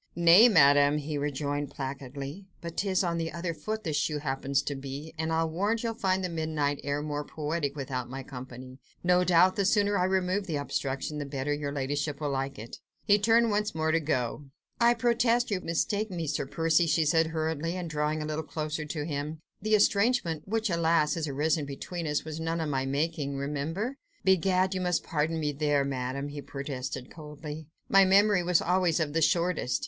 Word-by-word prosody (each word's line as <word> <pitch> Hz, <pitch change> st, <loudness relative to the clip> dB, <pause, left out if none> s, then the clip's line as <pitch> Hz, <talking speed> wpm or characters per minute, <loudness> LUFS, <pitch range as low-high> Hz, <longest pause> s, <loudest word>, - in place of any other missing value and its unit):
"Nay, 175 Hz, +7 st, +7 dB
Madame," 145 Hz, -5 st, +5 dB
he 150 Hz, +1 st, -4 dB
rejoined 145 Hz, 0 st, -2 dB
placidly, 140 Hz, +6 st, -6 dB
"but 170 Hz, -1 st, -7 dB
'tis 195 Hz, -1 st, +1 dB
on 170 Hz, -2 st, -1 dB
the 165 Hz, 0 st, -2 dB
other 170 Hz, 0 st, -3 dB
foot 215 Hz, +6 st, -4 dB
the 160 Hz, -, -2 dB
shoe 150 Hz, +1 st, 0 dB
happens 135 Hz, -1 st, -1 dB
to 145 Hz, -, -2 dB
be, 140 Hz, +3 st, -7 dB
and 160 Hz, 0 st, -2 dB
I'll 165 Hz, 0 st, +1 dB
warrant 205 Hz, +8 st, -1 dB
you'll 230 Hz, -1 st, -1 dB
find 190 Hz, -3 st, 0 dB
the -, -, 0 dB
midnight 155 Hz, -3 st, -1 dB
air 145 Hz, +1 st, -2 dB
more 150 Hz, -1 st, -3 dB
poetic 150 Hz, -1 st, -3 dB
without 130 Hz, -3 st, -4 dB
my 135 Hz, +1 st, -6 dB
company: 130 Hz, 0 st, -9 dB, 0.2 s
no 180 Hz, 0 st, +4 dB
doubt 180 Hz, +3 st, +4 dB
the 200 Hz, -, +2 dB
sooner 205 Hz, +1 st, +2 dB
I 180 Hz, -, +3 dB
remove 190 Hz, +1 st, 0 dB
the 160 Hz, -, -2 dB
obstruction 145 Hz, +1 st, -3 dB
the 145 Hz, -, -3 dB
better 140 Hz, +1 st, -2 dB
your 145 Hz, -1 st, -3 dB
ladyship 145 Hz, +1 st, -2 dB
will 150 Hz, -2 st, -2 dB
like 135 Hz, 0 st, -2 dB
it." 110 Hz, +2 st, -9 dB, 0.3 s
He 205 Hz, 0 st, +5 dB
turned 230 Hz, +2 st, +4 dB
once 210 Hz, -3 st, 0 dB
more 160 Hz, 0 st, +1 dB
to 165 Hz, -, +3 dB
go. 145 Hz, -2 st, -2 dB, 0.3 s
"I 235 Hz, 0 st, +5 dB
protest 235 Hz, 0 st, +2 dB
you 190 Hz, -2 st, 0 dB
mistake 205 Hz, +6 st, -1 dB
me, 170 Hz, -3 st, -3 dB
Sir 145 Hz, -2 st, -2 dB
Percy," 165 Hz, +2 st, +2 dB
she 160 Hz, 0 st, +2 dB
said 160 Hz, +1 st, +3 dB
hurriedly, 160 Hz, +1 st, -2 dB
and 180 Hz, -2 st, -4 dB
drawing 150 Hz, 0 st, -1 dB
a -, -, -4 dB
little 155 Hz, +1 st, -2 dB
closer 155 Hz, 0 st, -4 dB
to 150 Hz, 0 st, -4 dB
him; 150 Hz, 0 st, -4 dB, 0.2 s
"the 215 Hz, +2 st, +3 dB
estrangement, 200 Hz, -6 st, +2 dB
which, 220 Hz, 0 st, 0 dB
alas! 165 Hz, -2 st, +2 dB
has 160 Hz, -2 st, -2 dB
arisen 150 Hz, +2 st, 0 dB
between 165 Hz, +4 st, -5 dB
us, 150 Hz, 0 st, -1 dB
was 155 Hz, 0 st, -5 dB
none 165 Hz, +1 st, -2 dB
of 160 Hz, -2 st, -2 dB
my 135 Hz, -2 st, -1 dB
making, 145 Hz, 0 st, -1 dB
remember." 155 Hz, -, -3 dB, 0.3 s
"Begad! 190 Hz, 0 st, +3 dB
you 185 Hz, -, -2 dB
must 180 Hz, -1 st, 0 dB
pardon 160 Hz, +1 st, -1 dB
me 150 Hz, -1 st, 0 dB
there, 145 Hz, -1 st, +1 dB
Madame!" 135 Hz, +1 st, -3 dB
he 145 Hz, 0 st, -6 dB
protested 135 Hz, -2 st, -6 dB
coldly, 150 Hz, 0 st, -8 dB, 0.2 s
"my 195 Hz, 0 st, +6 dB
memory 195 Hz, 0 st, +5 dB
was 175 Hz, -1 st, +2 dB
always 180 Hz, -2 st, +2 dB
of 150 Hz, -2 st, -1 dB
the 165 Hz, -, +1 dB
shortest." 170 Hz, -3 st, +1 dB
160 Hz, 195 wpm, -28 LUFS, 145-180 Hz, 0.3 s, Nay